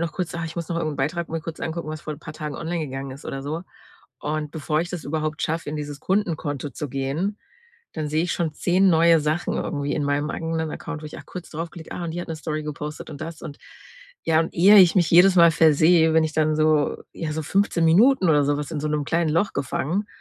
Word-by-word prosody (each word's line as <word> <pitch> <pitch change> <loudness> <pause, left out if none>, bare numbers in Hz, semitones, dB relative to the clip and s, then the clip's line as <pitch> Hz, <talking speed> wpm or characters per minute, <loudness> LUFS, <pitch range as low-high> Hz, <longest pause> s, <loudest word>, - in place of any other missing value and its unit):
noch 170 -1 -1
kurz 175 -1 -4
„Ah, 170 - -3
ich 165 +1 -7
muss 170 -2 -4
noch 170 - -2
irgend 155 -3 -2
'n - - -9
Beitrag 165 +5 -2
mir 165 0 -3
kurz 165 0 -7
angucken, 160 0 -4
was 155 0 -5
vor 155 - -4
'n - - -15
paar 160 - -9
Tagen 150 -3 -5
online 165 -1 -3
gegangen 135 0 -6
ist“, 140 - -12
oder 135 - -5
so. 155 +4 -3 0.6
Und 150 0 -3
bevor 155 0 -1
ich 175 +1 -4
das 175 -4 -5
überhaupt 155 +1 -2
schaffe, 165 0 -2
in 155 - -4
dieses 145 -1 -6
Kundenkonto 160 -8 -1
zu 150 +3 -5
gehen, 140 +10 -2 0.5
dann 155 -2 -3
sehe 155 +3 +1
ich 175 - -1
schon 160 -3 -2
10 185 +4 +3
neue 165 0 +5
Sachen 155 +3 -1
irgendwie 145 -2 -2
in 150 - -1
meinem 145 +1 0
eigenen 160 -1 -2
Account, 165 -2 -6
wo - - -6
ich 150 - -9
auch - - -13
kurz 180 -2 -9
draufklicke: 165 +1 -7
„Ah, - - -5
und 170 - -3
die 175 - -4
hat - - -6
'ne 165 - -3
Story 155 0 -4
gepostet, 150 0 -6
und 145 - -9
das 160 0 -6
und“ 145 - -8 0.7
ja, 160 -1 +3
und 165 - -2
ehe 195 +5 +7
ich 180 -3 +7
mich 175 -3 +4
jedes 180 +2 +7
Mal 170 -1 +7
versehe, 160 +1 +5
bin 160 0 +4
ich 155 - -2
dann 155 0 +1
so 155 -1 +2
ja, 160 - -4
so 160 +1 -3
15 195 -1 +1
Minuten 195 +5 +5
oder 145 -2 +4
so 145 +1 +1
was 150 +1 -5
in 150 - -2
so 155 - -2
'nem 150 -1 -1
kleinen 165 +2 +1
Loch 170 +6 +1
gefangen. 170 +9 -2
160 Hz, 250 wpm, -23 LUFS, 150-170 Hz, 0.7 s, ehe